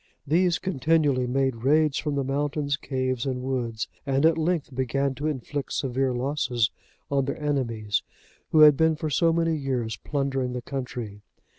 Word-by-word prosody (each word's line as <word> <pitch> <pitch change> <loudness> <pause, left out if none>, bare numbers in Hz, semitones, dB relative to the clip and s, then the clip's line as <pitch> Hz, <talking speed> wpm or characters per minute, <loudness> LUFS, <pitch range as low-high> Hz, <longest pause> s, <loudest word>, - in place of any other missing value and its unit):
These 170 +3 +3
continually 145 -6 +1
made 130 -1 0
raids 145 +3 +2
from 150 -2 -2
the 140 - 0
mountains, 145 +1 -1
caves, 130 -3 -2
and 125 -1 -2
woods, 120 -4 -2 0.2
and, 135 +1 +1
at 165 0 +5
length, 160 -3 -1
began 135 +2 0
to 145 +3 -3
inflict 145 0 -3
severe 130 0 0
losses 125 -3 0 0.4
on 140 -1 +2
their 140 - -3
enemies, 115 -8 -1 0.5
who 155 - +5
had 150 -1 +9
been 160 +2 +3
for 155 0 -3
so 165 +5 +3
many 165 0 +1
years 125 -6 -2
plundering 135 -3 -2
the 125 - -3
country. 120 -6 -5
135 Hz, 160 wpm, -26 LUFS, 125-150 Hz, 0.5 s, had